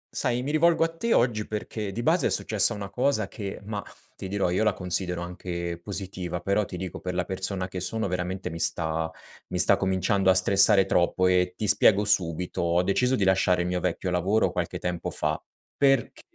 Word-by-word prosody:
Sai, 125 +1 0
mi 145 - -3
rivolgo 165 +2 +3
a 165 0 -2
te, 230 +7 -3
oggi, 115 -3 0
perché 105 -1 -5
di 115 +5 -5
base 165 +7 +2
è - - -1
successa 110 +1 +4
una 100 -2 -7
cosa 125 -6 0
che 100 -2 -7
mah, 105 -1 -5 0.3
ti - - -7
dirò, 95 -2 -1
io 95 +5 0
la 105 -2 +2
considero 90 -1 -1
anche 85 -1 -6
positiva 95 -3 -5
però, 100 +4 0
ti 90 - -8
dico, 90 -1 -6
per 90 0 -5
la 90 -1 -1
persona 95 0 -1
che 95 - -6
sono, 100 +4 0
veramente 90 0 -4
mi 85 - -7
sta 80 -1 0 0.4
mi - - -4
sta 90 - +5
cominciando 95 0 0
a 95 - +5
stressare 100 +1 +6
troppo 90 0 +1
e 90 0 +1
ti 105 - -2
spiego 105 +1 +5
subito. 90 -4 0
Ho 85 +1 +1
deciso 125 +7 +1
di 105 - -1
lasciare 95 -1 +2
il - - -3
mio 90 0 -2
vecchio 90 +1 -3
lavoro 95 +5 +1
qualche - - -4
tempo 90 -1 -4
fa, 75 0 -2 0.3
perché 135 -4 +1
95 Hz, 200 wpm, -25 LUFS, 90-105 Hz, 0.4 s, stressare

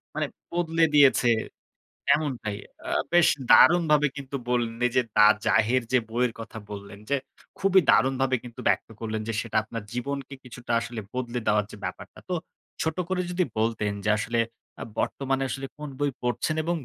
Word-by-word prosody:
মানে - - 0 0.3
বদলে 165 -1 +2
দিয়েছে। 140 -4 +6 0.9
এমনটাই 130 -9 -3 0.3
আ - - -3 0.2
বেশ 175 -1 +6 0.2
দারুণভাবে 155 -4 +6
কিন্তু 140 0 -6
বললেন 120 -2 0
এই 125 - +2
যে 125 - +5
'The 105 - +7 0.2
Zahir' 115 +3 +3
যে 130 - +6
বইয়ের 120 0 0
কথা 110 0 -8
বললেন 100 0 -8
যে 140 - +3 0.4
খুবই 195 -1 +5
দারুণভাবে 130 +1 +3
কিন্তু 120 -2 -11
ব্যক্ত - - +1
করলেন 110 -1 -3
যে 115 - -2
সেটা 115 - -2
আপনার 110 0 -6
জীবনকে 140 +2 -4
কিছুটা 125 -1 -8
আসলে 120 -1 -6
বদলে 125 -1 -3
দেওয়ার 105 -1 +3
যে - - -10
ব্যাপারটা। - - -7
তো 180 - 0 0.5
ছোট 160 +1 -1
করে 185 -1 0
যদি 180 +1 +1 0.2
বলতেন 110 -2 0
যে - - +2
আসলে 115 +2 -1 0.4
আ - - -2 0.2
বর্তমানে 135 0 -1
আসলে 135 0 -4
কোন 150 -1 -6
বই 145 -1 +1
পড়ছেন 125 +6 -1
এবং 170 +2 0
125 Hz, 165 wpm, -26 LUFS, 115-145 Hz, 0.9 s, The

